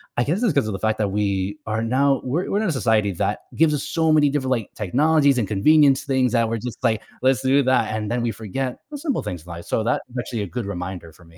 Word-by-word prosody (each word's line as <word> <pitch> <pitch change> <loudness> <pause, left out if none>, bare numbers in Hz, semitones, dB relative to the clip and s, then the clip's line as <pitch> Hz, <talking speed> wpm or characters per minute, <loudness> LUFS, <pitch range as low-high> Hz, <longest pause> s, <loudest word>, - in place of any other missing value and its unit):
I 120 - +2
guess 175 - -1
it's 215 -9 +2
'cause 140 -6 +1
of 110 - -3
the 95 - -4
fact 110 +2 0
that 105 -2 +1
we 100 -1 -1
are 110 0 -2
now 135 +4 +2
we're 145 +8 -1
we're 205 - +1
in 220 - 0
a - - +1
society 110 -6 +1
that - - -1 0.2
gives 155 -2 +3
us 145 - -1
so 160 -1 +1
many 150 -2 +4
different, 135 -2 -1
like, 115 -5 -1
technologies 140 - +2
and 110 - -1
convenience 140 +6 +4
things 130 -3 +1
that 115 -2 +2
we're 115 - -1
just 125 +1 -7
like, 110 -3 +1 0.2
"Let's 130 0 +3
do 135 +2 +3
that," 125 -4 +2
and 105 0 -3
then 120 - 0
we 120 - 0
forget 120 +4 -4
the 290 - -5
simple 285 -4 -2
things 90 -1 -6
life, 85 0 -8
so 110 - -1
that's 115 - 0 0.2
actually 120 -3 -3
a 100 - -5
good 115 +1 -5
reminder 90 -3 -6
for 85 - -19
me. 80 0 -19
120 Hz, 265 wpm, -22 LUFS, 105-140 Hz, 0.2 s, many